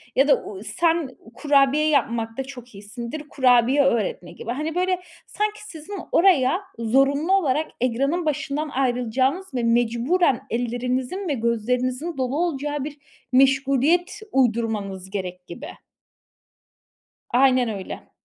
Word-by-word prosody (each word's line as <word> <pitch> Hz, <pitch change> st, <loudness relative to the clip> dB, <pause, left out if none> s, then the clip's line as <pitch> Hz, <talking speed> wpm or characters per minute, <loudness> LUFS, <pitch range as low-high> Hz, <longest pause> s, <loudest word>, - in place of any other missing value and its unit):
ya 270 Hz, +2 st, +4 dB
da, 290 Hz, -, +3 dB
uuu, 195 Hz, -1 st, -8 dB
sen 330 Hz, +3 st, +1 dB, 0.3 s
kurabiye 285 Hz, +1 st, +3 dB
yapmakta 230 Hz, -3 st, 0 dB
çok 250 Hz, -3 st, -11 dB
iyisindir, 235 Hz, +8 st, -7 dB
kurabiye 255 Hz, +1 st, +4 dB
öğretme 215 Hz, -8 st, 0 dB
gibi. 200 Hz, +6 st, -6 dB
Hani, 305 Hz, +5 st, -3 dB
böyle 365 Hz, 0 st, 0 dB, 0.3 s
sanki 425 Hz, 0 st, -2 dB
sizin 325 Hz, -1 st, -9 dB, 0.2 s
oraya 340 Hz, -2 st, +4 dB, 0.2 s
zorunlu 275 Hz, +8 st, +2 dB
olarak 310 Hz, -5 st, +1 dB
ekranın 275 Hz, +8 st, 0 dB
başından 305 Hz, 0 st, -2 dB
ayrılacağınız 260 Hz, +6 st, 0 dB
ve 245 Hz, -, -1 dB
mecburen 240 Hz, +6 st, +2 dB
ellerinizin 250 Hz, -, -2 dB
ve 300 Hz, -, 0 dB
gözlerinizin 250 Hz, +6 st, -1 dB
dolu 260 Hz, +1 st, -1 dB
olacağı 295 Hz, -4 st, -1 dB
bir 295 Hz, 0 st, -7 dB, 0.3 s
meşguliyet 275 Hz, +8 st, +3 dB
uydurmanız 220 Hz, -7 st, 0 dB
gerek 180 Hz, -2 st, -6 dB
gibi. 260 Hz, -, -8 dB, 1.6 s
Aynen 255 Hz, -1 st, +3 dB
öyle. 200 Hz, -4 st, -7 dB
265 Hz, 115 wpm, -23 LUFS, 235-305 Hz, 1.6 s, ya